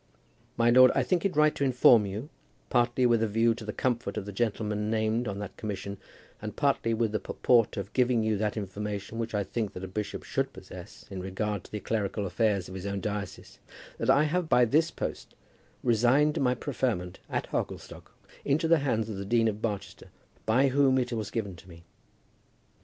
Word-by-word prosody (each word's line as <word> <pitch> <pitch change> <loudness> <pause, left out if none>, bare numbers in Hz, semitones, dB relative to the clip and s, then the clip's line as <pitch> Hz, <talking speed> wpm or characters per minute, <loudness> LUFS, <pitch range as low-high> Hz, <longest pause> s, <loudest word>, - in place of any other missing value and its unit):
My 120 0 +4
lord, 130 +1 +8
I - - +3
think 180 -1 0
it 195 - 0
right 150 0 +4
to - - -2
inform 125 -5 +5
you, 105 +9 -6 0.4
partly 120 +1 +2
with 120 -2 +3
a 115 - +2
view 115 +2 +2
to 115 0 -9
the 105 - -4
comfort 120 -3 -2
of - - -3
the 100 - -6
gentlemen 105 0 -1
named 110 +2 0
on 100 -1 -3
that 100 -2 -6
commission, 100 -2 -5 0.4
and 105 -1 -6
partly 140 -5 +1
with 115 -1 0
the 110 - -1
purport 120 -4 +2
of 100 +1 -5
giving 125 -3 +2
you 110 0 +1
that 105 +1 -1
information 105 +2 -5
which 115 -1 -3
I 100 - +1
think 110 +1 -3
that 90 - -7
a - - -4
bishop 105 +3 -4
should - - -2
possess - - -11
in 95 -1 -5
regard 95 +1 -3
to - - -15
the 105 - -3
clerical 105 -1 -2
affairs 100 -2 0
of 95 - -9
his 95 +1 -5
own 100 0 -2
diocese, 100 +1 -5 0.4
that - - -1
I 145 - +6
have 160 +2 0
by 125 0 +5
this 155 +8 +2
post - - -6 0.5
resigned 125 +6 +3
my 125 -1 +2
preferment 115 -9 -2
at - - -2
Hogglestock - - -5 0.3
into 155 +4 +1
the 165 -1 +5
hands 115 -6 0
of 110 -3 -5
the 100 - -4
Dean 115 +2 +3
of 105 -1 -2
Barchester, 105 -4 -4 0.4
by 130 +5 +4
whom 135 0 +3
it 125 -1 -1
was 110 -3 -3
given 100 -5 -3
to 90 - -16
me. 85 -1 -13
110 Hz, 200 wpm, -28 LUFS, 100-125 Hz, 0.5 s, lord